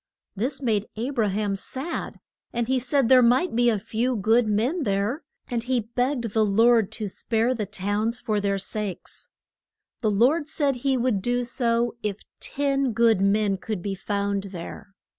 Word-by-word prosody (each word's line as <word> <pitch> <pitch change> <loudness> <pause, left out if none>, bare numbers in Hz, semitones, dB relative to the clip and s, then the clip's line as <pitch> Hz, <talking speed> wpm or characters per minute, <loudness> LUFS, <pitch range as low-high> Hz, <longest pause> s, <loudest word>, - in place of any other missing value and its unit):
This 260 +7 -3
made 215 -4 +1
A 235 +5 -3
bra 230 -6 +1
ham 200 0 -1
sad, 265 - -5 0.3
and 235 -1 -1
he 260 0 +2
said 255 +1 +1
there 255 +1 +7
might 250 +6 +3
be 240 0 +4
a 220 - +2
few 230 +5 -1
good 225 +3 +3
men 235 - +1
there, 205 - 0 0.3
and 240 -2 -2
he 250 0 0
begged 245 -2 0
the 220 - +3
Lord 225 +1 +4
to 215 - -3
spare 225 +5 0
the 215 -5 -3
towns 205 +6 -1
for 215 -3 -1
their 200 -1 0
sakes. 200 0 -5 0.7
The 220 - +2
Lord 260 +10 +3
said 285 -4 0
he 265 +1 +1
would 240 -5 +1
do 245 +3 0
so 235 -1 0
if 210 -2 -4 0.2
ten 275 -3 0
good 225 -3 +3
men 200 0 +2
could 185 0 -5
be 200 - -2
found 200 +1 -2
there. 195 +1 -9
230 Hz, 175 wpm, -25 LUFS, 205-250 Hz, 0.7 s, there